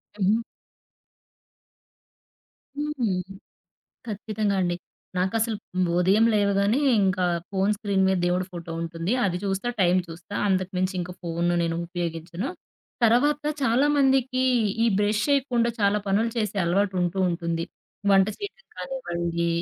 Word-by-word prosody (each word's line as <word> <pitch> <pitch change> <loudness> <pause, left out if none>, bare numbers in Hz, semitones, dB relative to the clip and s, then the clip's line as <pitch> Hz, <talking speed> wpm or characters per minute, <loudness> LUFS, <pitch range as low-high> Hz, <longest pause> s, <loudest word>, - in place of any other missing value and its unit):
హుహు. 210 +2 +2 2.4
హుహు. 295 -4 -2 1.0
ఖచ్చితంగా 210 -1 -2
అండి 175 -1 0 0.4
నాకసలు 220 +5 0 0.4
ఉదయం 195 +5 +4
లేవగానే 200 +3 +2 0.2
ఇంకా 185 -1 +1 0.2
ఫోను 195 +1 +1
స్క్రీన్ 200 -3 +1
మీద 190 0 +2
దేవుడి 180 +1 +1
ఫోటో 170 -1 -7
ఉంటుంది 165 +2 -3
అది 180 -2 0
చూస్తా, 195 +3 -1
టైం 180 0 +4
చూస్తా, 170 +4 -10
అంతకుమించి 185 0 0
ఇంకా 180 +1 -4
ఫోను 170 0 0
నేను 165 -1 0
ఉపయోగించను. 170 - -4 0.5
తర్వాత 280 +6 +3 0.2
చాలామందికి 265 0 +3 0.4
ఈ - - +4
బ్రష్ 210 +1 +1
చేయకుండా 260 -4 +2
చాలా 200 0 +3
పనులు 210 +4 +2
చేసే 210 -2 -1
అలవాటు 190 +3 +1
ఉంటూ 175 +2 -1
ఉంటుంది. 170 -1 -2 0.5
వంట 195 0 +5
చేయడం 410 +4 -8
కానివ్వండి 170 - -3
195 Hz, 115 wpm, -25 LUFS, 175-230 Hz, 2.4 s, వంట